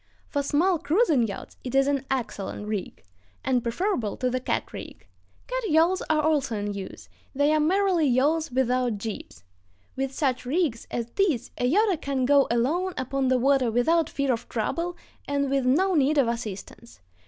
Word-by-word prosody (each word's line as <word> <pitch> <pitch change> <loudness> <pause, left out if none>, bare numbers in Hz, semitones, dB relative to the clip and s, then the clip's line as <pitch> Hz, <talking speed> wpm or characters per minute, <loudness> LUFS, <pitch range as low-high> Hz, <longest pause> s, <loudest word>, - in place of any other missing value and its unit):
For 285 - -2
small 325 +5 +2
cruising 300 - +2
yachts 200 - -8
it 255 +1 -4
is 270 0 +5
an 280 -1 0
excellent 210 -5 -3
rig, 210 - -4 0.4
and 255 -2 +2
preferable 235 - -1
to 255 -1 -1
the 255 - 0
cat 255 - -3
rig. - - -9 0.4
Cat - - -3
yawls 335 +4 +3
are 310 -1 +2
also 290 -7 +1
in 205 0 -3
use; 195 -1 -8 0.3
they 285 +2 +3
are 310 - +3
merely 360 0 +2
yawls 290 +5 +2
without 250 -2 +1
jibs. 205 - -7 0.5
With 270 0 -2
such 265 -3 -1
rigs 270 -3 -1
as 235 0 -4
these 355 - +1
a 245 +1 +1
yachter 400 -2 +2
can 270 -2 -1
go 280 +1 +4
alone 315 +11 0
upon 260 +1 -1
the 255 0 +3
water 265 -1 +3
without 315 +8 +2
fear 280 -2 0
of 230 - -6
trouble 335 +10 -2 0.3
and 280 -1 0
with 270 -2 +1
no 370 +9 +3
need 295 -1 +2
of 270 -4 +4
assistance. 230 0 -6
270 Hz, 175 wpm, -26 LUFS, 245-315 Hz, 0.5 s, is